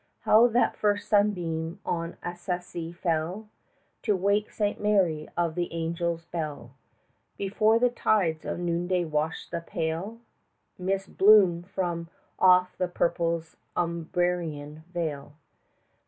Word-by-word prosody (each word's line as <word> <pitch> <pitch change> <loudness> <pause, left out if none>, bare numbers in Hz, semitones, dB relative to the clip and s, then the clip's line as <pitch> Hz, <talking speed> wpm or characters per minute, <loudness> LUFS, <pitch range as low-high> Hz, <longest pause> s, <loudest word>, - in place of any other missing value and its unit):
How 225 +3 +6
that 240 +1 +2
first 205 -1 0
sunbeam 175 -6 +1
on 170 -1 -3
Assisi 175 -1 -4
fell 175 +4 -2 0.5
To 210 -3 +1
wake 200 +3 +1
Saint 205 -1 -2
Mary 185 -7 +2
of 170 -2 +1
the 175 +1 -2
Angels' 165 0 -2
bell, 150 -8 -5 0.7
Before 215 +3 +2
the 245 +1 +3
tides 185 -10 +1
of - - -3
noonday 175 +1 0
washed 155 0 -2
the 170 - -2
pale 165 +6 -3 0.6
25 - - -38
Mist 195 0 -2
bloom 195 -4 +7
from 175 -2 -3 0.3
off 180 0 +5
the 180 - +1
purple 170 -1 0 0.3
Umbrian 170 -3 -2
vale! 155 -5 -4
175 Hz, 120 wpm, -27 LUFS, 165-195 Hz, 0.7 s, bloom